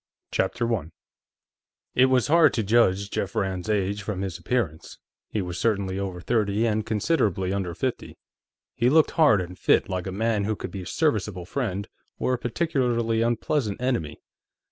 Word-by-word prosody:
_ - - -58
CHAPTER 115 +5 0
1 100 -9 -2 1.0
It 130 +1 +5
was 130 -3 +3
hard 165 +2 +5
to 115 - 0
judge 100 -2 +2
Jeff 95 - -3
Rand's 95 0 -2
age 100 -1 0
from 100 -2 -4
his 95 -4 -4
appearance; 100 -12 -2 0.3
he 105 - -2
was 90 -1 -5
certainly 100 -4 0
over 95 -2 -4
thirty 105 +1 +1
and 110 -1 +1
considerably 105 - 0
under 95 -4 -2
fifty. - - -3 0.6
He 120 - +2
looked 155 +2 +4
hard 145 - +4
and 90 +1 -8
fit, - - +3
like 95 -1 -3
a - - -3
man 105 +1 0
who 110 +1 0
could - - -7
be 95 - -6
a 90 - -8
serviceable 105 - 0
friend 100 -3 -3 0.3
or 130 - 0
a 125 - -1
particularly 120 -5 0
unpleasant 115 -1 0
enemy. 125 - -1
105 Hz, 170 wpm, -25 LUFS, 95-120 Hz, 1.0 s, It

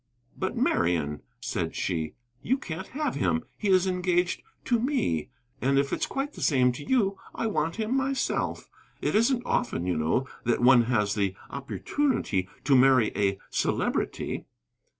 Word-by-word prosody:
"But, - - -3
Marian," 80 -4 +1 0.2
said - - -2
she, 80 -4 -2 0.3
"you 260 - +1
can't 190 -7 -6
have 290 -1 -2
him. 240 0 0
He 210 - -3
is 185 -1 +5
engaged 180 -1 +1 0.2
to 240 -2 +2
me. 225 - 0 0.3
And 135 +2 +2
if 140 0 +1
it's - - 0
quite 275 +2 -3
the - - -10
same 130 -4 +4
to 125 +4 -7
you, 200 - +1 0.2
I - - -2
want 165 -6 0
him 225 +3 -1
myself. 270 0 -1 0.3
It - - -1
isn't 240 +3 +2
often, 165 - 0
you 90 - 0
know, 80 +12 +1 0.2
that 120 0 +1
one 120 -1 +6
has 105 -4 +1
the 100 -3 0 0.2
opportunity 140 - -1
to 135 0 +4
marry 130 -3 +5
a 100 -1 +1
Celebrity." - - -1
145 Hz, 155 wpm, -27 LUFS, -, 0.3 s, one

